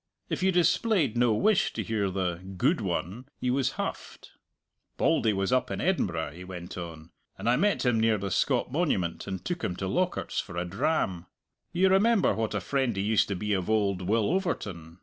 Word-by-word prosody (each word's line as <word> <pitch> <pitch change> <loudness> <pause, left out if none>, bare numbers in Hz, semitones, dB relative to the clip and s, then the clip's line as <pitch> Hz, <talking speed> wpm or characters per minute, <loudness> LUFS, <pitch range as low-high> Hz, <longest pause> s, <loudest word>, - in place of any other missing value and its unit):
If - - -2
you 190 +1 +3
displayed 175 - +2
no 120 -2 +3
wish 210 - +2
to - - -3
hear 105 -3 -1
the 90 -2 -1 0.2
"good 150 - +2
one," 95 +6 -3
he 125 - 0
was 130 -1 +1
huffed. - - -6 0.7
"Bauldy 110 - +3
was 95 +3 0
up 130 - +2
in - - -3
Edinburgh," 90 - 0
he 90 - -10
went 90 -1 -8
on, 85 -2 -8 0.3
"and - - -5
I 120 - +5
met 200 -1 +1
him 120 -2 +3
near 110 -1 +3
the 100 -1 -4
Scott 125 - +1
Monument 130 - -1
and 95 -1 -5
took 175 -2 -3
him 90 - -1
to 95 - -4
Lockhart's 180 - -1
for 90 -3 -6
a 85 - -1
dram. 95 - -1 0.4
You 185 +2 +3
remember 205 +2 +4
what 110 -1 -2
a - - +1
friend 130 +1 0
he 95 - -1
used 110 +1 +3
to 100 - -2
be 105 +3 -1
of 95 -1 -1
old 100 -4 +1
Will 105 - +1
Overton. 95 - -3
110 Hz, 200 wpm, -28 LUFS, 95-150 Hz, 0.7 s, I